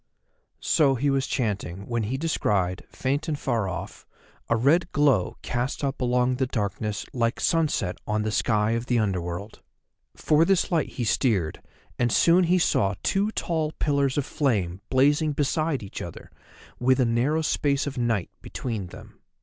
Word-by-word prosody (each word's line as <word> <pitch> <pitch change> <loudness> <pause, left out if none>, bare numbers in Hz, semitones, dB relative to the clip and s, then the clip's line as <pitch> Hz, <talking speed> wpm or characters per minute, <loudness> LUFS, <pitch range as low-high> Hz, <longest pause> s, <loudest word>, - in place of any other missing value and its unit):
So 140 -3 +3
he 140 +3 +1
was 135 0 0
chanting 100 -6 -2
when 120 0 -1
he 115 +5 -2
descried, 100 - 0
faint 140 +4 -2
and 155 -2 -1
far 115 -8 -1
off, 90 - -7 0.4
a 115 - +3
red 155 +9 +2
glow 140 -10 +2
cast 120 +4 -2
up 135 0 -2
along 125 0 +1
the 130 -1 0
darkness 105 -2 -3
like 115 -1 0
sunset 155 - +1
on 105 0 0
the 110 - -1
sky 105 0 +1
of 115 +2 -2
the 120 - +2
Under 100 -5 0
world. 90 +5 -6 0.5
For 155 +1 +3
this 190 +1 +2
light 165 -4 +1
he 125 - -3
steered, 105 - 0 0.4
and 120 -1 +2
soon 175 +7 +4
he 180 +2 +3
saw 100 - +2
two 200 +2 +1
tall 160 -2 -1
pillars 140 -2 0
of 145 - 0
flame 100 - -1
blazing 145 +3 +3
beside 145 -1 0
each 100 - -7
other, - - -9 0.5
with 130 +2 +3
a 130 - +4
narrow 130 +8 +1
space 140 -2 +1
of 140 -2 -4
night 115 -6 0
between 110 -7 -5
them. - - -13
125 Hz, 165 wpm, -25 LUFS, 105-145 Hz, 0.5 s, soon